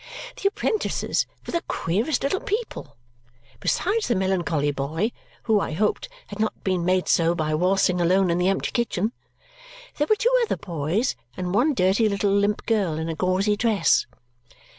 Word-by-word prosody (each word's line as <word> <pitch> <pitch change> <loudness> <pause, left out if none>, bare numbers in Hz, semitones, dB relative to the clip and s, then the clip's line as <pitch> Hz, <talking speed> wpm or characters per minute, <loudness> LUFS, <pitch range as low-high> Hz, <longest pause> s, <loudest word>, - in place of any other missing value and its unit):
The 395 - +3
apprentices 430 +1 -1 0.2
were - - -6
the 340 - 0
queerest 220 - -1
little 330 +8 0
people. 415 - -4 0.6
Besides 415 - 0
the 240 - +1
melancholy 175 -6 0
boy, 155 - -2 0.3
who, 220 -2 +3
I 175 - -3
hoped, 210 +6 -1 0.2
had 205 - -10
not 220 0 -2
been 185 -3 0
made 185 +1 +1
so 170 0 +3
by 155 -2 -1
waltzing 180 +2 +2
alone 185 +1 +3
in 170 - 0
the 180 +1 +2
empty 195 - -1
kitchen, 225 -3 -1 0.9
there 295 - +2
were 430 - +5
two 485 +3 +1
other 465 - 0
boys 170 - -1 0.2
and 180 -1 -3
one 270 +7 +2
dirty 195 +3 +3
little 200 0 0
limp 200 +1 +1
girl 195 -9 +1
in 160 +1 -3
a 165 - -3
gauzy 185 +5 +1
dress. 220 - +2
195 Hz, 165 wpm, -24 LUFS, 175-225 Hz, 0.9 s, were